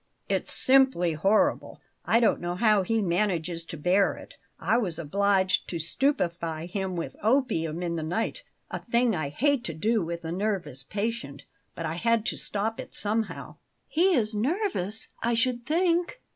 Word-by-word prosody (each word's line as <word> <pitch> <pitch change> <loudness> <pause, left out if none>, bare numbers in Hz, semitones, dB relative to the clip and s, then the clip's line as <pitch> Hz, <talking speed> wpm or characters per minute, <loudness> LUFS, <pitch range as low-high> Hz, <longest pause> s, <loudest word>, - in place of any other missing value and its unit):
"It's - - -1
simply 260 -11 +4
horrible; 215 - +1 0.3
I 230 - +4
don't 235 - +2
know 175 0 -2
how 210 0 +4
he 220 +3 0
manages 175 -2 0
to 165 - -7
bear 180 +5 +2
it. - - -12 0.3
I 220 +7 +2
was 180 -9 -2
obliged 190 +3 +1
to 170 - -3
stupefy 170 - -1
him 190 +1 -3
with 170 - -4
opium 180 - +1
in 170 -1 -2
the - - -2
night 220 - -2 0.3
a - - -3
thing 235 -2 +1
I 155 -4 -2
hate 275 - +1
to 165 - -4
do 220 +7 +1
with 170 0 -5
a 160 - -3
nervous 180 -8 -2
patient; 200 - -4 0.3
but 165 - -4
I 160 +1 -3
had 230 +2 +2
to - - -1
stop 220 +4 -3
it - - -7
somehow." 220 +2 -2 0.3
"He 360 +3 +3
is 220 -4 +1
nervous, 230 - -1
I 235 +1 +1
should 240 +1 0
think." 345 +6 +1
205 Hz, 170 wpm, -27 LUFS, 170-235 Hz, 0.3 s, simply